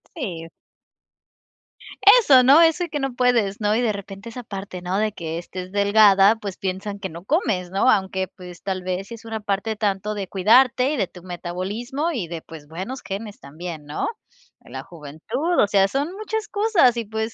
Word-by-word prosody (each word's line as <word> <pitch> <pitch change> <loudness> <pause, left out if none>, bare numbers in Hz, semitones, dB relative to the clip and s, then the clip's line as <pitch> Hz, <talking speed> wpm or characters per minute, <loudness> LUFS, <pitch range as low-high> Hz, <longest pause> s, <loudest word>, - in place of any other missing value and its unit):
Sí. 175 - -5 1.7
Eso, 275 - +6
¿no?, 275 +6 +7
eso 330 +2 +4
de 340 - -12
que 295 - -3
no 270 -2 -2
puedes, 230 -5 +1
¿no?, 210 0 +2
y 240 - +1
de 220 -3 +1
repente, 200 +2 -8
esa 250 +2 -7
parte, 195 -4 -7
¿no?, 180 +2 -2
de 215 +1 +1
que 165 -4 -5
estés 180 +1 -7
delgada, 200 0 +5
pues 200 -3 -6
piensan 195 +2 -4
que 190 -2 -5
no 170 +2 -10
comes, 195 - 0
¿no?, 195 +2 +3
aunque 190 -1 0
pues, 180 -2 -13
tal 190 -1 -3
vez 185 +2 -4
sí - - -7
es 230 0 -11
una 225 -1 -4
parte 210 +1 -2
tanto 210 0 -1
de 195 -2 -4
cuidarte, 250 +8 +4
y - - -2
de 205 - +1
tu 180 0 -14
metabolismo, 195 - -4
y 225 - -3
de, 165 -1 -6
pues, 155 -3 -12
buenos 190 - -6
genes 200 +2 -6
también, 155 +2 -8
¿no?, 145 - -3 0.5
en - - -16
la - - -5
juventud, 175 - -3
o 205 - +4
sea, 195 -1 +3
son 280 - -2
muchas 430 +1 -4
cosas, 405 - +3
y 230 - -2
pues, 220 +2 -3
200 Hz, 195 wpm, -22 LUFS, 185-245 Hz, 1.7 s, no